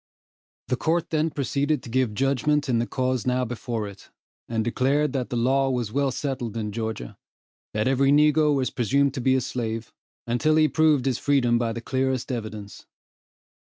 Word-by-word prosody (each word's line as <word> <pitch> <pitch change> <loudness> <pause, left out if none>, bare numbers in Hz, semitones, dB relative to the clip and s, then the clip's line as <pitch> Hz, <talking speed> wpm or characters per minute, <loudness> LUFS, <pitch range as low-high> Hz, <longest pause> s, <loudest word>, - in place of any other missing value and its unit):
The 125 - +1
court 165 +5 0
then 160 0 +1
proceeded 145 0 -1
to - - -9
give 125 -4 +1
judgment 140 +3 +1
in 120 -3 +2
the 120 - -1
cause 130 -1 -1
now 125 0 +1
before 115 -2 -4
it, 100 -1 -13 0.4
and 115 -1 0
declared 135 +5 +1
that 130 -3 -2
the - - -3
law 135 +3 +2
was 120 -5 -2
well 140 +2 +1
settled 130 -4 -3
in 105 -2 -3
Georgia 110 - -5 0.6
that 105 +2 +1
every 135 +1 +3
negro 150 0 +4
was 130 -2 0
presumed 135 +2 +1
to 130 - -4
be 130 +2 +3
a 130 - +2
slave, 115 -2 -4 0.3
until 120 +7 +1
he 155 0 +5
proved 155 -4 +3
his 130 -3 0
freedom 125 -5 +2
by 115 -1 0
the 115 +1 -5
clearest 130 +1 -1
evidence. 110 -4 -6
130 Hz, 180 wpm, -25 LUFS, 115-140 Hz, 0.6 s, he